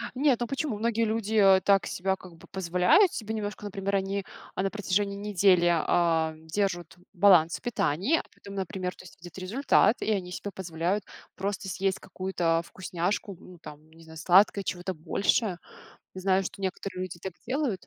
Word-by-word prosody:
Нет, 265 -2 +2
ну 240 - 0
почему? 270 -3 -3
Многие 230 +1 +1
люди, 220 -1 -2
э, 195 -3 +6
так 195 -1 +3
себя 190 +1 -1
как 180 -3 -14
бы - - -16
позволяют 180 - +3
себе 220 -1 -4
немножко, 210 -1 -5
например, 200 0 -3
они, 195 0 -2 0.3
а, - - -1
на 195 - 0
протяжении 200 -1 -1
недели, 195 -3 +3
а, 165 -1 +2
держут 170 +1 -3 0.2
баланс 180 -4 +5
в - - -29
питании, 240 - +1
а - - -4
потому, 200 0 -11
например, 185 -1 -3
то - - -14
есть 175 - -14
видят 175 +1 -11
результат, 215 +3 +2
и - - 0
они 190 -4 -1
себе 205 - -5
позволяют 180 +2 -2 0.3
просто 195 0 -3
съесть 190 +1 -1
какую-то, 180 -3 -1
а, - - -2
вкусняшку, 185 +2 -3
ну, 180 -1 -14
там, 155 0 -13
не 165 +1 -17
знаю, 160 0 -13
сладкое, 190 +4 +4
чего-то 185 +1 -3
большее. 180 +4 0 0.6
Знаю, 190 0 +1
что 190 - -7
некоторые 190 0 -4
люди 180 -2 -6
так 190 - -5
делают. 255 -6 -2
190 Hz, 180 wpm, -28 LUFS, 175-205 Hz, 0.6 s, э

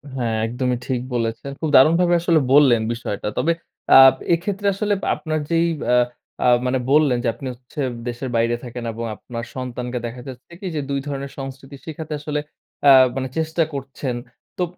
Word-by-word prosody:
হ্যাঁ, 120 -4 -1
একদমই 125 +1 -1
ঠিক 125 -2 -1
বলেছেন। 115 +3 -2
খুব 160 - 0
দারুণভাবে 170 +6 +5
আসলে 170 -2 +3
বললেন 135 -6 +6
বিষয়টা। 115 -4 -4
তবে 170 - +2 0.4
আ - - +9 0.4
এক্ষেত্রে 200 +4 -3
আসলে 205 +1 0 0.2
আপনার 155 -1 -3
যেই 165 0 +2 0.3
আ - - +5 0.4
অ্যা - - +1 0.2
মানে 130 +1 +1
বললেন 145 -4 +4
যে - - 0
আপনি 135 - -8
হচ্ছে 125 +4 -8 0.3
দেশের 120 +2 -4
বাইরে 115 +1 +2
থাকেন 125 -1 -7
এবং 115 +1 -5
আপনার 115 0 -7
সন্তানকে 125 -1 -4
দেখা 120 +1 -6
যাচ্ছে 130 +5 -11
কি 195 - -5
যে 150 - -1
২ 140 0 0
ধরনের 140 -1 -4
সংস্কৃতি 135 +1 -8
শিখাতে 160 -1 -6
আসলে 150 0 -3 0.4
অ্যা 140 -1 +8 0.2
মানে 135 -1 -2
চেষ্টা 160 +1 +1
করছেন। 135 -2 -4 0.4
তো 180 - +1
135 Hz, 170 wpm, -21 LUFS, 125-155 Hz, 0.4 s, আ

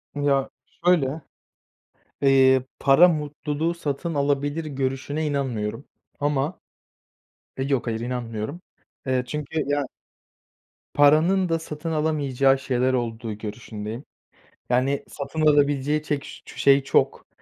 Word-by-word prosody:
Ya, 140 -2 +1 0.4
şöyle: 160 -4 +2 1.0
Eee, 130 -2 +5 0.2
para 140 +6 +7
mutluluğu 150 0 -2
satın 165 0 -3
alabilir 145 +2 0
görüşüne 135 +2 -2
inanmıyorum 130 -4 -2 0.3
ama 145 +3 -1 1.0
Eee, 130 - 0
yok, 135 -4 0
hayır, 115 -1 -2
inanmıyorum, 120 +4 -4 0.5
eee, 130 -1 +1
çünkü 150 +3 -3
ya 145 0 0 1.1
Paranın 160 +6 +4
da 165 0 +1
satın 160 +1 -6
alamayacağı 140 -4 +2
şeyler 130 -1 0
olduğu 115 -2 -2
görüşündeyim. 110 +3 -7 0.6
Yani, 130 +3 +1
satın 140 +2 -5
alabileceği 145 0 +3
çek 145 -2 -2
ş - - -11
çu - - -12
şey 140 0 +5
çok. - - +1
140 Hz, 110 wpm, -24 LUFS, 130-150 Hz, 1.1 s, para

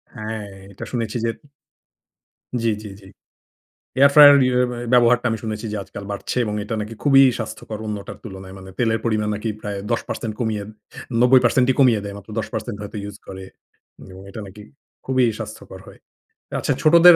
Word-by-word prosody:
হ্যাঁ, 110 -1 -5 0.3
এইটা 100 - -8
শুনেছি 115 -2 -2
যে - - +1 1.3
জ্বী, 115 -1 +2
জ্বী, 105 - -8
জ্বী। 95 -1 -15 0.9
এয়ার 140 +1 +7
ফ্রায়ার 145 -1 +10
ইউ 125 - +1 0.4
ব্যবহারটা 125 0 +5
আমি 115 - -1
শুনেছি 110 0 -4
যে, 105 - -2
আজকাল 100 - -9
বাড়ছে 100 +5 -4
এবং 105 - -3
এটা 110 +2 -3
নাকি 105 +2 -6
খুবই 135 -2 +7 0.2
স্বাস্থ্যকর 110 -1 -6
অন্যটার 105 -2 -5
তুলনায়। 95 -3 -9
মানে 95 0 -11
তেলের 115 -2 +1
পরিমাণ 110 -2 0
নাকি 110 +2 -3
প্রায় 100 -1 -4
১০% 115 -1 -3
কমিয়ে 110 -4 -1 0.6
৯০% 125 0 +5
কমিয়ে 120 -6 +5
দেয়। 100 -1 -6
মাত্র 100 +1 -14
১০% 110 -1 -4
হয়তো 105 +1 -7
ইউজ 100 -1 -7
করে 95 0 -8 0.7
এবং 95 +1 -11
এটা 105 - -8
নাকি, 105 +2 -12 0.4
খুবই 130 -1 +2
স্বাস্থ্যকর 110 -3 -8
হয়। - - -14 0.6
আচ্ছা - - +1
ছোটদের 170 +2 +8
110 Hz, 160 wpm, -21 LUFS, 105-125 Hz, 1.3 s, ফ্রায়ার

